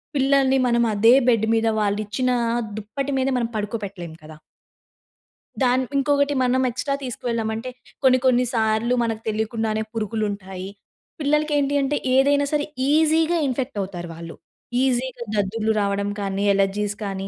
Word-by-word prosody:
పిల్లల్ని 270 -1 +3
మనం 235 0 +2
అదే 225 +4 +5 0.2
బెడ్ 225 -2 +2
మీద 225 0 +1
వావాళ్లిచ్చిన 210 +4 -1 0.5
దుప్పటి 270 +7 -4
మీద 260 +1 +1
మనం 235 -2 0
పడుకోపెట్టలేం 200 -5 -5
కదా! 155 0 -12 1.3
దాన్ 255 +1 +3
ఇంకొకటి 285 +1 +2
మనం 255 +1 +2
ఎక్స్‌ట్రా 275 +3 -2
తీసుకు 250 -2 -6
వెళ్ళామంటే 225 +1 -2 0.3
కొన్ని 255 -1 +6
కొన్ని 250 -1 +4
సార్లు 220 +1 +1
మనకు 225 -1 -2
తెలియకుండానే 220 0 -1
పురుగులుంటాయి. 205 -4 -4 0.5
పిల్లలకి 300 +1 +1
ఏంటి 285 0 +1
అంటే 275 +2 0 0.2
ఏదైనా 285 +2 +4
సరే 295 -1 +1 0.3
ఈజిగా 320 +2 +3
ఇన్ఫెక్ట్ 260 -1 -3
అవుతారు 180 -3 -6
వాళ్ళు. 165 0 -9 0.5
ఈజిగా 255 -1 -1
దద్దుర్లు 215 +2 0
రావడం 200 0 -1
కానీ, 195 0 -2
అలెర్జీస్ 200 +1 0
కానీ 195 -1 -4
230 Hz, 130 wpm, -22 LUFS, 205-265 Hz, 1.3 s, కొన్ని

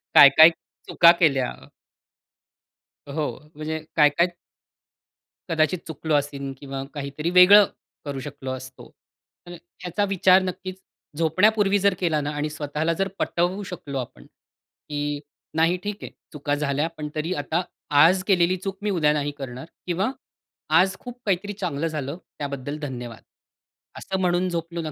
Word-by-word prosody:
काय, 140 - +11
काय 160 +1 +11 0.4
चुका 170 0 +7
केल्या. 135 -6 +2 1.6
हो, 150 -1 -1 0.3
म्हणजे 155 +1 -4 0.2
काय 150 -2 +6
काय 170 +5 +2 1.2
कदाचित 165 +2 +1
चुकलो 160 0 -3
असेन 140 -1 -2
किंवा 135 -1 -6
काहीतरी 145 +3 -4
वेगळं 195 +3 +8 0.4
करू 140 -2 -4
शकलो 140 -2 -6
असतो. 130 0 -9 0.6
तर - - -9 0.3
ह्याचा 180 +3 -1
विचार 190 0 +5
नक्कीच 185 0 -5 0.4
झोपण्यापूर्वी 200 +5 +3
जर 200 0 +3
केला 160 -4 +1
ना 145 - -3
आणि 150 +1 -2
स्वतःला 150 +2 -2
जर 195 +3 -1
पटवू 180 +4 0
शकलो 155 -7 -6
आपण, 125 - -8
की 145 0 -7 0.4
नाही, 165 +3 +3
ठीक 205 0 -3
आहे. - - -7 0.2
चुका 145 -1 -1
झाल्या 145 +1 0
पण 150 -1 -5
तरी 160 +4 -2
आता 165 +4 -1 0.4
आज 185 +3 +4
केलेली 185 -1 +3
चूक 195 +1 -5
मी 210 - 0
उद्या 155 -6 +2
नाही 145 -1 -1
करणार 130 -1 -7 0.2
किंवा 190 +7 0 0.7
आज 190 +1 +2
खूप 245 0 -10
काहीतरी 205 +1 -1
चांगलं 165 -6 -2
झालं, 150 0 -4 0.2
त्याबद्दल 140 0 -4
धन्यवाद. 125 -5 -7 0.8
असं 190 0 -4
म्हणून 180 0 +1
झोपलो 170 0 -4
ना 155 -1 -5
160 Hz, 140 wpm, -24 LUFS, 145-185 Hz, 1.6 s, काय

